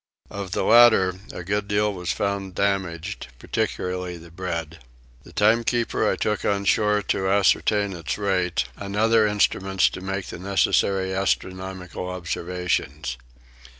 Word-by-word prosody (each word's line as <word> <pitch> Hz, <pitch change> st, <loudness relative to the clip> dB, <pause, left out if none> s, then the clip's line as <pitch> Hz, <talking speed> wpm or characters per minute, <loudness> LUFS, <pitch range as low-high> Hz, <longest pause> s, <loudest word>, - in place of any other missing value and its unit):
Of 100 Hz, -2 st, -5 dB
the -, -, 0 dB
latter 115 Hz, -6 st, +6 dB, 0.2 s
a 90 Hz, -, -7 dB
good 100 Hz, +3 st, -1 dB
deal 105 Hz, 0 st, +1 dB
was 90 Hz, -2 st, -3 dB
found 100 Hz, -2 st, -2 dB
damaged, 95 Hz, -8 st, -2 dB
particularly 90 Hz, +5 st, -3 dB
the 85 Hz, 0 st, -14 dB
bread. 85 Hz, -2 st, -5 dB, 0.4 s
The -, -, -16 dB
timekeeper 115 Hz, +2 st, +2 dB
I -, -, 0 dB
took 105 Hz, -1 st, -1 dB
on 100 Hz, 0 st, 0 dB
shore 105 Hz, +1 st, +2 dB
to 95 Hz, 0 st, 0 dB
ascertain 100 Hz, +1 st, +2 dB
its 85 Hz, -3 st, -4 dB
rate, 95 Hz, -4 st, 0 dB
and 100 Hz, 0 st, -6 dB
other 110 Hz, 0 st, +4 dB
instruments 95 Hz, -2 st, +2 dB
to -, -, -8 dB
make 95 Hz, 0 st, -3 dB
the -, -, -8 dB
necessary 95 Hz, 0 st, +1 dB
astronomical 95 Hz, -1 st, -3 dB
observations. 85 Hz, -6 st, -3 dB
95 Hz, 135 wpm, -24 LUFS, 90-105 Hz, 0.4 s, latter